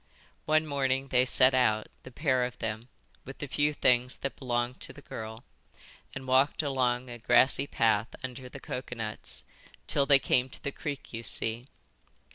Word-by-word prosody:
One 155 +1 +3
morning 135 -2 0
they 125 0 +4
set 130 0 +5
out, 110 -4 +3 0.2
the - - -11
pair 130 -1 +1
of 125 0 -4
them, 115 +2 -4 0.3
with 135 - -9
the - - -4
few 145 +2 +1
things 125 -3 +2
that 135 - -4
belonged 120 -1 -2
to - - -5
the 145 - -14
girl, 110 0 -7 0.7
and 135 - -6
walked 135 +4 +3
along 130 -3 0
a 120 -1 -8
grassy 130 +4 +4
path 110 -4 +2 0.2
under 125 0 -6
the 140 - -9
coconuts, 115 -5 -6 0.4
till 140 -1 +1
they 140 - +8
came 130 -1 +1
to - - -7
the 140 - -2
creek 140 -2 -6
you 115 - -4
see. 115 +1 -1
130 Hz, 170 wpm, -29 LUFS, 120-135 Hz, 0.7 s, they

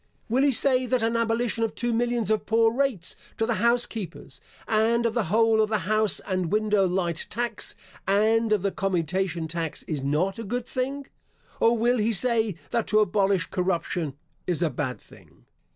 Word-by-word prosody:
Will 250 +4 +2
he 280 0 +4
say 255 0 +3
that 250 -2 +1
an 230 +1 +1
abolition 230 0 0
of 225 - -2
two 240 0 -1
millions 235 -2 0
of 215 - 0
poor 225 0 +3
rates 250 -10 -1 0.2
to 225 - +1
the 235 - 0
house 235 +1 +3
keepers, 195 -7 -8 0.3
and 225 +2 +2
of 230 - +1
the 235 -2 0
whole 220 +4 +3
of 215 - +1
the 215 - +1
house 215 -1 +2
and 185 -3 -2
window 210 -2 +2
light 175 -2 -2
tax 235 -1 -3 0.3
and 220 +3 +3
of 210 -3 +2
the 200 - +1
commutation 180 -2 -1
tax 165 -1 -4
is 150 -4 -4
not 160 +9 0
a - - -4
good 245 +3 -3
thing? 270 +3 -3 0.5
Or 230 +1 +4
will 240 +2 +2
he 220 +2 +1
say 225 -2 +2 0.2
that 235 -2 0
to 215 - +2
abolish 195 -2 +1
corruption 175 -5 -1 0.3
is 175 -1 0
a 160 - +1
bad 130 0 -3
thing? - - -20
215 Hz, 185 wpm, -26 LUFS, 185-235 Hz, 0.5 s, he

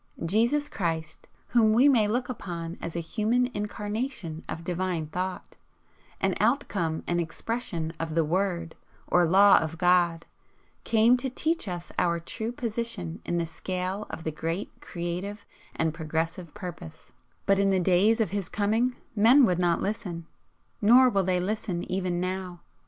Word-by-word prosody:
Jesus 235 - +2
Christ, 160 - -4 0.2
whom 220 -3 +4
we 250 +6 +6
may 235 -7 +4
look 245 +4 -1
upon 170 -8 -5
as 170 - -5
a - - 0
human 235 +8 0
Incarnation 210 - -4
of 165 - -5
Divine 180 -1 -2
Thought, 180 +4 -5 0.6
an 195 -1 +1
outcome 205 - 0
and 175 0 0
expression 170 -2 -3
of 160 -1 -3
the 165 -1 +3
'Word' 170 -1 -1 0.3
or 180 0 +3
Law 195 +4 +7
of 160 +1 -4
God, 175 -1 +3 0.6
came 230 +2 +4
to 265 +2 -2
teach 320 +2 -1
us 175 -2 -5
our 170 -1 +1
true 220 +7 -4
position 230 - -4
in 175 - -1
the 170 - 0
scale 185 +4 -4
of 160 - -7
the 160 - -2
great 165 +5 -3
Creative 180 +4 -5 0.3
and 160 -1 0
Progressive 165 +2 -3
Purpose, 175 -5 -9 0.3
but 195 0 +3
in 200 0 +3
the 190 -1 +3
days 190 +6 +3
of 215 -6 +1
His 200 -3 -3
coming 225 +5 +1 0.2
men 240 +6 +7
would 180 -4 +1
not 175 -1 +2
listen, 190 -5 -4 0.6
nor 245 +4 +7
will 195 -2 +2
they 180 0 +1
listen 185 -2 -2
even 185 -2 -1
now. 185 -1 -4
185 Hz, 155 wpm, -27 LUFS, 170-220 Hz, 0.6 s, Law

